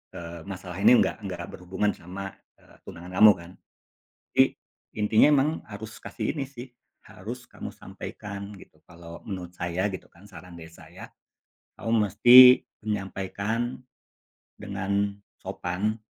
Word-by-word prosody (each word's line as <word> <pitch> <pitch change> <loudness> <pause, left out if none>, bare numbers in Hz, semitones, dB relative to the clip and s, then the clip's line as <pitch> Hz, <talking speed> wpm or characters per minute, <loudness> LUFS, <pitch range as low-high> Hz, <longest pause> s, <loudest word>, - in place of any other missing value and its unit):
eee, 85 0 -8
masalah 95 -1 -7
ini 125 - +7
nggak - - -3
nggak 85 -2 -5
berhubungan 95 +3 -2
sama 95 +2 -8 0.2
e - - -28 0.2
tunangan 90 +2 -10
kamu 110 -1 +10
kan. 85 0 -12 0.8
Jadi - - +6 0.5
Intinya 110 +1 +4
memang 145 +1 +3
harus 110 +1 -9
kasih 115 +6 -4
ini 140 - -2
sih, 130 -1 -10 0.4
harus 120 +6 -9
kamu - - -8
sampaikan 100 0 -8
gitu - - -18
kalau 85 0 -13
menurut 90 -3 -7
saya 85 +3 -1
gitu 95 -2 -7
kan 95 +4 -18
saran 90 -2 -13
dari 80 -1 -11
saya 85 - -13 0.7
kamu 115 - -4 0.2
mesti 125 +5 +9 0.2
menyampaikan 105 +3 -3 0.8
dengan 100 +1 -2 0.2
sopan 100 +5 -3
100 Hz, 130 wpm, -26 LUFS, 90-110 Hz, 0.8 s, kamu